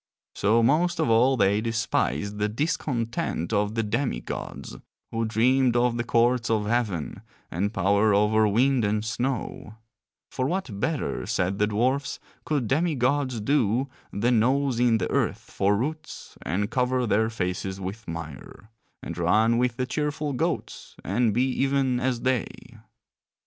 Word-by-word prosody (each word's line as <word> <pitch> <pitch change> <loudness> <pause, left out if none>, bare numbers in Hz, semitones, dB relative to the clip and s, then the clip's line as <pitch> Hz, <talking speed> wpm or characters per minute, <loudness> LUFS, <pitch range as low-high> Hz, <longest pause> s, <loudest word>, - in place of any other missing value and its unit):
So 110 +3 +2
most 170 +8 +2
of 115 - +2
all 125 +4 +4
they 100 0 +3
despised 105 - -1
the 105 +1 +1
discontent 125 - -2
of 105 +1 0
the 115 - +1
demi 120 +6 -1
gods, - - -7 0.3
who 115 0 -1
dreamed 120 +3 +2
of 120 0 +2
the 120 - -1
courts 120 0 +2
of 110 -2 +1
heaven 105 -8 -1 0.3
and 100 +5 -1
power 100 +2 +2
over 105 +2 +3
wind 125 +4 +2
and 105 +1 0
snow; 120 -2 -3 0.6
for 130 - -1
what 155 - -3
better, 145 +6 -2
said 95 +2 -1
the 105 - +3
dwarfs, 130 +7 0 0.3
could 145 -7 0
demi 155 +5 +1
gods 130 -1 0
do 130 +1 +1 0.2
than 115 +3 +2
nose 130 +1 +1
in 120 -2 +4
the 95 - -1
earth - - -1
for 100 +1 +2
roots 155 +7 -5
and 100 +4 -2
cover 125 0 +1
their 110 +1 +2
faces 95 -2 -3
with 100 +4 -6
mire, 80 +6 -8 0.3
and 85 0 -6
run 110 +7 +3
with 125 -1 0
the 130 - 0
cheerful 150 +2 -2
goats 125 - -3
and 115 +4 +1
be 120 +5 +2
even 135 -1 +1
as 125 -2 -1
they? 130 -4 +1
115 Hz, 150 wpm, -25 LUFS, 105-130 Hz, 0.6 s, all